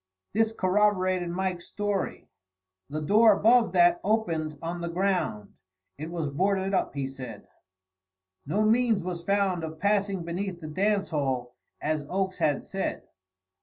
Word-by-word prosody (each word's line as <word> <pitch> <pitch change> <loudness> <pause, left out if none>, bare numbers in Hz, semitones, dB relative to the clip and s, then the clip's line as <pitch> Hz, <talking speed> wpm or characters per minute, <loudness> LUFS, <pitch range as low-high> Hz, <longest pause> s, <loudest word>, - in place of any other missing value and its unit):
This 220 +1 +2
corroborated 185 -3 +1
Mike's 180 0 -3
story. 205 -2 -3 0.6
The 155 +2 -3
door 215 +7 +6
above 230 +3 +4
that 345 0 +4
opened 165 -9 0
on 170 +2 -4
the 170 - -3
ground. 175 - -1 0.5
It 155 +2 -5
was 170 -2 -3
boarded 190 +6 0
up, 185 - 0
he 140 -1 -1
said. 125 -6 -9 1.0
No 200 +8 +1
means 225 -2 +3
was 175 -1 -4
found 195 -2 +1
of 160 0 -5
passing 200 -2 +1
beneath 175 +2 -4
the 155 -2 -7
dance 200 +5 +1
hall, 130 -5 -2 0.3
as 155 -1 -1
Oakes 190 0 -1
had 145 -2 +1
said. 195 0 -3
185 Hz, 140 wpm, -27 LUFS, 160-205 Hz, 1.0 s, door